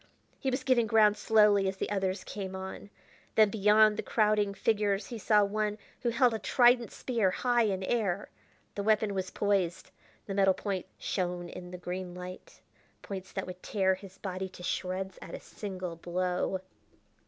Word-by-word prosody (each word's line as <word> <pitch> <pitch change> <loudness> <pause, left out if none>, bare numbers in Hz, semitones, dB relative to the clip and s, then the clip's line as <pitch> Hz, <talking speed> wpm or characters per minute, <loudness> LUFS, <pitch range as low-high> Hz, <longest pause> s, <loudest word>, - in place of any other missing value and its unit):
He 265 - -1
was 255 - -2
giving 240 -4 +3
ground 215 -2 +5
slowly 210 -2 +4
as 190 0 -2
the - - -3
others 190 -1 -1
came 190 -2 -6
on. 190 +2 -7 0.5
Then 215 -2 +5
beyond 210 0 +5
the - - 0
crowding 210 -2 +1
figures 205 -1 +1
he 230 +2 -7
saw 210 0 +4
one 210 +1 -1 0.2
who 240 - 0
held 240 0 +3
a 220 - -2
trident 245 -1 +4
spear 230 -7 0
high 240 +4 +2
in 190 -2 -1
air. 200 -3 -1 0.4
The 205 - -3
weapon 215 0 +2
was 190 -1 -2
poised; 195 -4 0 0.3
the 195 - -4
metal 195 -1 +4
points 195 -3 -3
shone 175 -1 -2
in 180 0 -9
the 180 - -7
green 180 0 -5
light 180 0 -9 0.4
points 190 -1 -7
that 190 - -3
would 180 0 -9
tear 190 -3 +1
his 190 0 -10
body 190 -1 -4
to 180 -1 -12
shreds 185 +1 -3
at - - -7
a - - -7
single 185 -4 -6
blow. 180 +2 -1
200 Hz, 175 wpm, -30 LUFS, 185-215 Hz, 0.5 s, ground